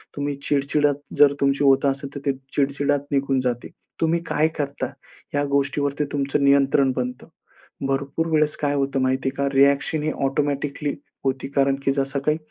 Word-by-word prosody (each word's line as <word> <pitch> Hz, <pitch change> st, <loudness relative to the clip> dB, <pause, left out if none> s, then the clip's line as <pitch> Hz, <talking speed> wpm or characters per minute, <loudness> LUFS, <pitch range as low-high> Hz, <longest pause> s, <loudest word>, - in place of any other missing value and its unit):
तुम्ही 145 Hz, 0 st, -2 dB
चिडचिडत 145 Hz, 0 st, +1 dB, 0.2 s
जर, 145 Hz, -1 st, +6 dB
तुमची 140 Hz, +1 st, +2 dB
होत 135 Hz, 0 st, +4 dB
असेल 140 Hz, +1 st, -2 dB
तर, -, -, -4 dB
ते 140 Hz, -, +2 dB, 0.2 s
चिडचिडत 140 Hz, 0 st, +1 dB
निघून 135 Hz, -1 st, +1 dB
जाते. 125 Hz, -1 st, -2 dB, 0.3 s
तुम्ही 165 Hz, +1 st, +2 dB
काय 155 Hz, +1 st, +2 dB
करता 140 Hz, -1 st, -2 dB, 0.4 s
या 145 Hz, -, +2 dB
गोष्टीवर 140 Hz, 0 st, 0 dB
ते 150 Hz, -, +2 dB
तुमचं 140 Hz, 0 st, 0 dB
नियंत्रण 140 Hz, -1 st, +4 dB
बनतं. 125 Hz, 0 st, -4 dB, 0.6 s
भरपूर 140 Hz, +4 st, -1 dB
वेळेस 155 Hz, -2 st, +2 dB
काय 145 Hz, -1 st, 0 dB
होतं 135 Hz, -1 st, 0 dB
माहिती 130 Hz, +1 st, +1 dB
आहे -, -, -10 dB
का? 140 Hz, 0 st, 0 dB
रिॲक्शन 140 Hz, +2 st, +3 dB
ही 155 Hz, -, 0 dB
ऑटोमॅटिकली 145 Hz, +1 st, -1 dB, 0.3 s
होती, 135 Hz, 0 st, -1 dB
कारण 140 Hz, -1 st, +2 dB
की 135 Hz, -, +2 dB
जसं 135 Hz, 0 st, -1 dB
काही 155 Hz, +1 st, +2 dB
140 Hz, 170 wpm, -23 LUFS, 135-145 Hz, 0.6 s, जर